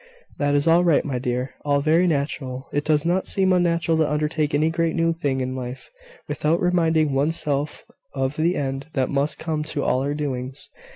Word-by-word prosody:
"That 145 Hz, 0 st, +2 dB
is 145 Hz, +2 st, +1 dB
all 170 Hz, +2 st, +5 dB
right, 170 Hz, -4 st, +3 dB
my 135 Hz, -4 st, -2 dB
dear: 125 Hz, +1 st, -2 dB
all 145 Hz, -1 st, +2 dB
very 160 Hz, +5 st, +3 dB
natural. 140 Hz, -4 st, -2 dB
It 145 Hz, -, 0 dB
does 150 Hz, -1 st, +2 dB
not 180 Hz, +2 st, +1 dB
seem 190 Hz, -1 st, +1 dB
natural 170 Hz, -2 st, +2 dB
to 155 Hz, -2 st, +1 dB
undertake 150 Hz, 0 st, 0 dB
any 155 Hz, +2 st, +2 dB
great 165 Hz, 0 st, 0 dB
new 165 Hz, 0 st, +2 dB
thing 140 Hz, -5 st, -1 dB
in 130 Hz, 0 st, -3 dB
life, 125 Hz, -, -7 dB, 0.4 s
without 160 Hz, +3 st, 0 dB
reminding 160 Hz, -4 st, +2 dB
one's 145 Hz, +5 st, +1 dB
self 145 Hz, 0 st, -2 dB, 0.3 s
of 135 Hz, +1 st, -1 dB
the 165 Hz, +4 st, +1 dB
end 135 Hz, 0 st, -3 dB
that 130 Hz, -2 st, 0 dB
must 145 Hz, +2 st, 0 dB
come 160 Hz, -2 st, -2 dB
to 145 Hz, -2 st, -2 dB
all 130 Hz, -, +1 dB
our 145 Hz, +2 st, -1 dB
doings. 135 Hz, -2 st, -4 dB
150 Hz, 195 wpm, -23 LUFS, 135-165 Hz, 0.4 s, all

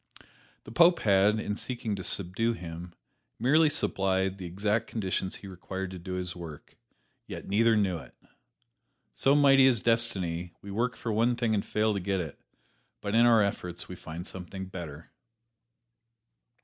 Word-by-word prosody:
The -, -, -11 dB
Pope 170 Hz, +7 st, +5 dB
had, 100 Hz, +1 st, +4 dB
in 105 Hz, -1 st, -2 dB
seeking 115 Hz, -3 st, -4 dB
to 95 Hz, -, -6 dB
subdue 100 Hz, +7 st, 0 dB
him, 85 Hz, -3 st, -8 dB, 0.4 s
merely 150 Hz, +6 st, +4 dB
supplied 95 Hz, -8 st, +1 dB
the 90 Hz, -, -5 dB
exact 105 Hz, +5 st, -1 dB
conditions 95 Hz, -3 st, -2 dB
he 100 Hz, -, -9 dB
required 95 Hz, 0 st, -6 dB
to 95 Hz, -, -7 dB
do 90 Hz, +2 st, -6 dB
his 90 Hz, -1 st, -4 dB
work 80 Hz, -4 st, -10 dB, 0.5 s
yet -, -, -7 dB
neither 110 Hz, +2 st, +3 dB
knew 95 Hz, -5 st, +1 dB
it. -, -, -14 dB, 1.0 s
So 135 Hz, +1 st, +3 dB
mighty 135 Hz, -2 st, +6 dB
is 125 Hz, -4 st, +3 dB
Destiny: 95 Hz, -7 st, 0 dB
we 100 Hz, -, -9 dB
work 120 Hz, +4 st, -1 dB
for 115 Hz, -, -3 dB
one 115 Hz, +3 st, +2 dB
thing 120 Hz, -2 st, 0 dB
and 100 Hz, -, +1 dB
fail 110 Hz, 0 st, +1 dB
to 100 Hz, -, -1 dB
get 95 Hz, +1 st, -1 dB
it, 80 Hz, -5 st, -6 dB, 0.6 s
but 100 Hz, -, -4 dB
in 115 Hz, +1 st, +6 dB
our 115 Hz, -3 st, +6 dB
efforts 90 Hz, -3 st, -4 dB
we 90 Hz, -, -7 dB
find 85 Hz, +1 st, -8 dB
something 95 Hz, 0 st, -7 dB
better. 85 Hz, -5 st, -9 dB
100 Hz, 160 wpm, -29 LUFS, 90-115 Hz, 1.0 s, mighty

